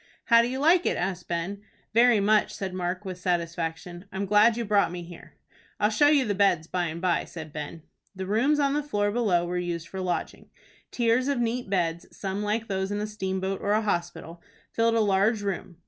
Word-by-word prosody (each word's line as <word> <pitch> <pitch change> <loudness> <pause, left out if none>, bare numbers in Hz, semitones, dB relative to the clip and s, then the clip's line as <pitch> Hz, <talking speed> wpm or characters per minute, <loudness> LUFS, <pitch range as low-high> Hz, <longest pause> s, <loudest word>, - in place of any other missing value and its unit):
"How 230 -1 +6
do 235 - 0
you 255 +2 -3
like 335 +5 +4
it?" - - 0
asked 180 -1 -3
Ben. 175 +4 -3 0.3
"Very 235 -1 +5
much," 210 +1 +2
said 190 -2 -4
Mark, 180 +2 -3
with 185 -1 -6
satisfaction. 175 0 -3
"I'm 195 +1 -3
glad 210 +3 +4
you 235 - -2
brought 200 -4 +2
me 175 0 -6
here." 170 0 -13 0.4
"I'll 210 +1 +2
show 290 +7 +4
you 290 -3 +4
the 205 - 0
beds 190 -5 +2
by 180 +1 -2
and 165 0 -4
by," 175 -1 +1
said 160 -3 -9
Ben. 150 +2 -7 0.3
The 190 0 -5
rooms 245 +10 +2
on 280 -1 +2
the 295 - +1
floor 205 -8 -1
below 205 -7 +1
were 180 +1 -2
used 170 -2 -4
for 190 - -6
lodging. 180 -1 -3 0.4
Tiers 240 +2 +1
of 280 -2 0
neat 240 -1 -2
beds, 170 -3 -1
some 195 0 -3
like 215 +2 -1
those 190 -1 -2
in 205 - -1
a 210 - -1
steamboat 190 -2 -3
or 205 - +1
a 215 - +2
hospital, 175 -3 -3 0.3
filled 230 0 +2
a 225 - +3
large 205 +2 +2
room. 190 -3 -4
195 Hz, 210 wpm, -26 LUFS, 175-225 Hz, 0.4 s, How